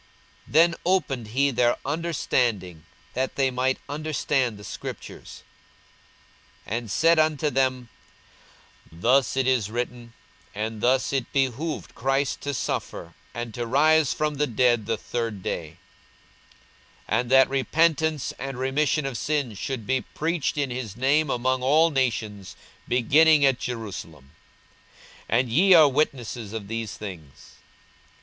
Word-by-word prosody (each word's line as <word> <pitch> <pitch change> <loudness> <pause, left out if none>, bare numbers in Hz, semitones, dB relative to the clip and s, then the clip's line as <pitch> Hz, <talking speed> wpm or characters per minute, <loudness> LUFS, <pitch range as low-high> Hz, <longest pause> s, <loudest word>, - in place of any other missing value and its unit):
42:024:045 - - -15
Then 170 +1 +5
opened 155 - 0
he 135 +5 +1
their 120 -1 +2
understanding, 125 - -1 0.3
that 130 +1 -2
they 135 -1 +1
might 130 +1 0
understand 145 -5 -1
the 105 - -12
scriptures, - - -8 1.2
42:024:046 - - -4
And 115 -2 -4
said 165 +6 +4
unto 155 -1 +2
them, 130 -2 0 1.0
Thus 125 +11 +2
it 135 - +2
is 125 -6 +1
written, 120 0 -5 0.4
and 110 +1 -4
thus 130 +3 +2
it 130 -4 -2
behoved 140 +4 -2
Christ 135 +1 -1
to 145 -1 -3
suffer, - - -4 0.2
and 120 -1 -5
to 120 +1 -4
rise 155 +3 +4
from 150 -1 -1
the 150 +1 +1
dead 120 -2 +2
the 115 -1 0
third 115 -3 -4
day: 80 0 -4 1.3
42:024:047 110 - +1
And 120 - -8
that 135 0 +6
repentance 155 +2 +1
and 135 -1 -5
remission 135 +3 0
of 135 -4 -3
sins 140 -9 -2
should 130 -5 -4
be 130 +2 0
preached 160 +1 -2
in 140 -3 -1
his 120 -5 -5
name 140 +4 +2
among 130 +1 0
all 155 +6 +4
nations, 110 -7 -2 0.3
beginning 145 +5 +4
at 135 -2 +2
Jerusalem. 90 - -7 1.0
42:024:048 115 - +3
And 125 -1 -1
ye 185 +9 +5
are 155 -3 +8
witnesses 125 -6 -2
of 110 -3 -5
these 115 -1 -5
things. 85 -10 -10
130 Hz, 140 wpm, -25 LUFS, 115-145 Hz, 1.3 s, are